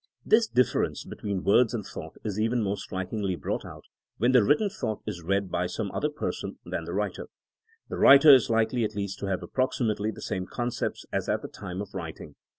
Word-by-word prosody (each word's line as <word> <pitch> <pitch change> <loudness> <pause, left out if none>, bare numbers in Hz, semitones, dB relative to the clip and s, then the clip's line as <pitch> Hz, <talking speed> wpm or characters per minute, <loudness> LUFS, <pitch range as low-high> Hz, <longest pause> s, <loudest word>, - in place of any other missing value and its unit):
This 225 +1 +4
difference 125 - +1
between 100 -3 -4
words 120 +3 +4
and 105 -4 -4
thought - - -9
is 105 -1 -3
even 115 +1 +1
more 100 0 0
strikingly 95 0 -3
brought 75 - -3
out - - -10 0.3
when 120 +3 +3
the 125 -4 +6
writ 145 +8 +4
ten 215 - 0
thought 115 - -4
is 85 - -5
read 95 +2 -1
by 90 - 0
some 100 +1 -4
other 150 - -1
person 150 - -4
than - - -4
the - - -5
writer. - - -2 0.6
The - - -5
writer 140 +2 +9
is 130 - +5
likely 115 +1 +2
at 110 0 -2
least 100 -1 -3
to 100 - -3
have 95 -1 -2
approximately 110 -5 0
the 110 - -7
same 95 0 -3
concepts 120 -1 -3
as - - -1
at - - 0
the - - -4
time 95 +2 -6
of 100 - -13
writing. 80 -4 -7
105 Hz, 210 wpm, -27 LUFS, 95-125 Hz, 0.6 s, writer